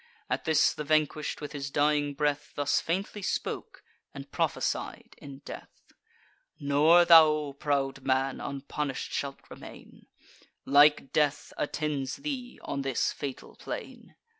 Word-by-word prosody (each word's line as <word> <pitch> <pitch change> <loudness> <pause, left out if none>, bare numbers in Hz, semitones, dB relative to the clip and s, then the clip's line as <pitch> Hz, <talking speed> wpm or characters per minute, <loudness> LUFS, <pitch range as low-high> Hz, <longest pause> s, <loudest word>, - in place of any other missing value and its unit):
At - - -1
this 160 -1 +3
the 150 - -5
vanquish'd, 155 0 0
with 150 - -6
his 140 -1 -5
dying 145 0 +1
breath, 145 0 -1
Thus 145 -1 +1
faintly 195 +5 -3
spoke, - - -4 0.3
and - - -9
prophesied - - -2
in 140 0 -11
death: - - -11 0.7
"Nor 150 +5 +5
thou, 155 -4 +6
proud 135 -2 -1
man, 135 0 0
unpunish'd 140 0 -4
shalt 140 -1 -4
remain: - - -13 0.6
Like 145 -1 +5
death 150 -1 0
attends 145 -3 -2
thee 275 -4 -6
on 140 - -3
this 135 -2 0
fatal 140 -3 -7
plain." - - -8
145 Hz, 125 wpm, -28 LUFS, 140-155 Hz, 0.7 s, thou